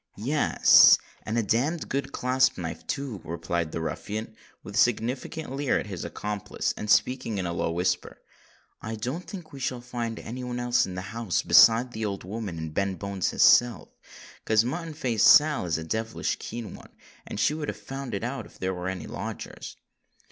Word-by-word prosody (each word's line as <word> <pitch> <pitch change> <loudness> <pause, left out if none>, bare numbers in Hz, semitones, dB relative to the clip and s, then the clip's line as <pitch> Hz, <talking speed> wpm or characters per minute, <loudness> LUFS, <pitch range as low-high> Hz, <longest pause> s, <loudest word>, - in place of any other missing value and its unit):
"Yes—and 120 -2 +4
a 115 - +2
damned 140 - 0
good 135 0 -2
clasp 130 +1 +2
knife 85 -2 -6
too," 135 -8 -4
replied 85 0 -3
the 80 - -4
ruffian, 105 +6 -5 0.3
with 100 - -9
a - - -3
significant 125 +5 0
leer 140 -1 +1
at - - -3
his 95 -5 -6
accomplice, 105 -1 -3
and 105 - -6
speaking 115 -1 +2
in 95 - -2
a 85 - -2
low 85 - -1
whisper. 90 +2 -1 0.6
"I 110 +1 -4
don't 130 +11 -5
think 180 -8 -9
we 140 - -8
shall 130 -1 -2
find 120 -2 -4
any 125 +3 -7
one 125 0 -4
else 120 0 +2
in 90 - -7
the 95 - -4
house 115 -5 -1
besides 120 +2 +6
that 110 - -4
old 100 -2 -3
woman 100 -2 -5
and 80 -1 -5
Ben 100 +2 0
Bones 100 -2 -2
his - - +2
self, 120 -9 +5 0.5
'cause 110 +1 +3
Mutton 160 +4 -4
Face 120 -7 0
Sal 150 -8 +6
is 80 - 0
a 80 - -5
devilish 110 +6 -2
keen 115 -2 -6
one—and - - -12
she 150 - +3
would 155 -1 -4
have - - -4
found 135 -4 -6
it 100 - -4
out 120 -1 -4
if - - -19
there 95 0 -2
was 90 0 -4
any 95 -1 -5
lodgers." - - -7
115 Hz, 190 wpm, -27 LUFS, 95-130 Hz, 0.6 s, besides